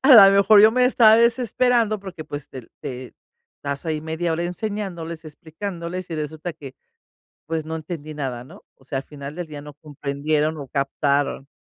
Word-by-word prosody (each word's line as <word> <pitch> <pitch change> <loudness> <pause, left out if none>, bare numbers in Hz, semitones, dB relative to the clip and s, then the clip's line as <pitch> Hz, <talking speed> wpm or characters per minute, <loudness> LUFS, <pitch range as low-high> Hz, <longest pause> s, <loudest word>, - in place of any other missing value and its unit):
a 270 - +5
la 200 -4 +11
mejor 200 +1 +6
yo 215 +1 +7
me 250 0 +3
estaba 225 -3 +6
desesperando 235 -2 +2
porque, 180 -5 -8
pues, 145 -1 -7
te 130 -2 -9 0.2
te 125 -1 -7 0.5
estás 140 +2 -4
ahí 155 -1 -1
media 160 +2 -2
hora 170 +2 -1
enseñándoles, 175 -4 -4
explicándoles, 170 +3 -6
y - - -3
resulta 155 +2 -4
que, 140 -4 -11 0.7
pues, 160 0 -2
no 160 +1 -4
entendí 155 -1 -7
nada, 130 -4 -4
¿no? - - -15
O 135 - -23
sea, 135 0 -3
al 135 - -5
final 140 0 -8
del 175 -2 -4
día 150 -2 -8
no 150 -1 -11
comprendieron 150 +1 -2
o 140 - -7
captaron. 140 +1 0
160 Hz, 180 wpm, -23 LUFS, 145-195 Hz, 0.7 s, la